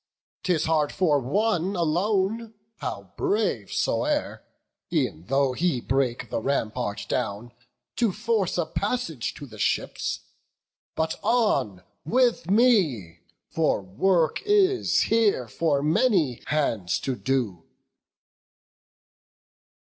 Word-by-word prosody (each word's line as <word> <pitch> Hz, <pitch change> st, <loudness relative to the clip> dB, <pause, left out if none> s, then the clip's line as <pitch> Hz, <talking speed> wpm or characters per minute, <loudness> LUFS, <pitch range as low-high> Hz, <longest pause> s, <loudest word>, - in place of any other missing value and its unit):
'Tis 175 Hz, -5 st, +1 dB
hard 155 Hz, -2 st, +1 dB
for 155 Hz, -6 st, +2 dB
one 190 Hz, -, 0 dB
alone, 195 Hz, +6 st, 0 dB, 0.2 s
how 100 Hz, -2 st, -6 dB
brave 200 Hz, -, 0 dB
soe'er, -, -, -1 dB, 0.5 s
E'en 80 Hz, +3 st, -1 dB
though 135 Hz, +1 st, +2 dB
he 165 Hz, -2 st, 0 dB
break 130 Hz, -1 st, -1 dB
the -, -, 0 dB
rampart 110 Hz, -5 st, -2 dB
down, 105 Hz, +4 st, -3 dB, 0.4 s
to 230 Hz, -4 st, +2 dB
force 215 Hz, -2 st, -1 dB
A 175 Hz, -, +1 dB
passage 200 Hz, -, -2 dB
to 145 Hz, -, -8 dB
the 110 Hz, -5 st, -13 dB
ships; -, -, -1 dB, 0.7 s
but 160 Hz, 0 st, -1 dB
on 140 Hz, -, +1 dB, 0.2 s
with 240 Hz, -1 st, +1 dB
me! 175 Hz, -, +3 dB, 0.3 s
For 155 Hz, -10 st, +1 dB
work 160 Hz, -, +1 dB
is 400 Hz, -2 st, +3 dB
here 215 Hz, -, +2 dB
for 145 Hz, +2 st, 0 dB
many 155 Hz, -, +2 dB
hands 115 Hz, -12 st, 0 dB
to 130 Hz, -, -2 dB
do." 120 Hz, -11 st, -2 dB
155 Hz, 105 wpm, -25 LUFS, -, 0.7 s, me